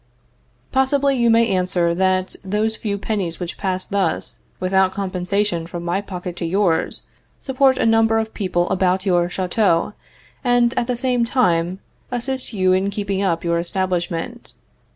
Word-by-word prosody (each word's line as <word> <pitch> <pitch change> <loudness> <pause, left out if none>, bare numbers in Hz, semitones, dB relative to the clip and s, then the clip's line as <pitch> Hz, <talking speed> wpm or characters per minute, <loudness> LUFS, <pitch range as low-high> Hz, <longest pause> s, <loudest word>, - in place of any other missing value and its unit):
Possibly, 275 +1 +2
you 235 -2 +2
may 230 0 +5
answer 180 -3 +1
that 185 +1 +1
those 210 +3 0
few 205 -2 -3
pennies 195 -5 -3
which 175 -1 -5
pass 185 -2 -2
thus, 195 -4 -1 0.2
without 190 0 +2
compensation, 185 -2 -1
from 175 0 -6
my 175 +3 0
pocket 180 -3 -6
to 170 - -3
yours, 175 -2 0 0.4
support 265 -1 +2
a - - +1
number 225 0 +4
of 220 0 -2
people 180 -3 0
about 185 +1 +1
your 175 -2 +2
chateau, 185 0 +1 0.5
and 245 -1 +3
at 235 - 0
the 250 -1 -1
same 250 -1 +1
time 180 -8 +1 0.3
assist 255 +1 -1
you 185 -4 +2
in 190 +2 +1
keeping 200 -1 -2
up 170 -4 0
your 170 -1 +1
establishment. 180 +5 -3
195 Hz, 155 wpm, -20 LUFS, 180-225 Hz, 0.5 s, may